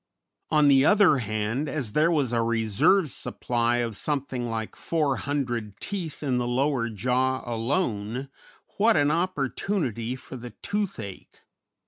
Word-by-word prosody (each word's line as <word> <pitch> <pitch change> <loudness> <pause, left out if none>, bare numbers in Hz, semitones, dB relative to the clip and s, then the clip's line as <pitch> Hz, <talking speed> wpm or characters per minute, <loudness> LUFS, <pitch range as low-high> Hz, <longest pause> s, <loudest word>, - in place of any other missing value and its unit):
On 150 -1 +4
the 135 -1 +6
other 195 -4 +5
hand, 110 +6 -2
as 135 -8 -3
there 155 +8 +3
was 145 -8 +1
a 115 - +2
reserve 115 - +2
supply 120 0 -1
of 115 -2 -5
something 130 -1 -2
like 110 -1 -4
400 135 -8 -1
teeth 175 -7 -5
in 130 -3 +1
the 120 - -1
lower 125 -1 +1
jaw 125 +5 0
alone, 120 - -2 0.5
what 220 +2 +4
an 145 0 +3
opportunity 145 - -1
for 130 0 -9
the 120 0 -9
toothache! 180 - -4
130 Hz, 130 wpm, -26 LUFS, 115-150 Hz, 0.5 s, the